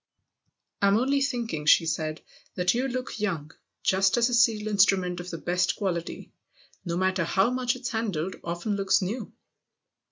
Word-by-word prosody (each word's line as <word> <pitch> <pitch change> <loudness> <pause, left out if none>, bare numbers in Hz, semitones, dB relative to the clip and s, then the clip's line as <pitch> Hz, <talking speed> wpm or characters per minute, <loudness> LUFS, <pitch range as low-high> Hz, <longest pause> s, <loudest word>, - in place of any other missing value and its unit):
" - - -52
I'm 200 +1 +4
only 275 +4 +1
thinking," 235 - -2
she 165 - +6
said, 160 -1 -2 0.2
" - - -33
that 180 0 +2
you 250 +3 0
look 255 -3 -4
young 165 -8 -2 0.3
just 190 +3 +3
as 240 +1 +3
a - - -3
steel 225 -3 +3
instrument 190 -3 +2
of 175 +1 -7
the 165 - -5
best 175 +2 0
quality, 175 -5 -4 0.5
no 170 -2 -3
matter 185 -1 +1
how 190 +7 +2
much 250 -1 0
it's 250 -1 -5
handled, 195 -6 -2
often 175 +5 -3
looks 195 -1 +2
new." 215 +5 -4
195 Hz, 170 wpm, -26 LUFS, 175-235 Hz, 0.5 s, she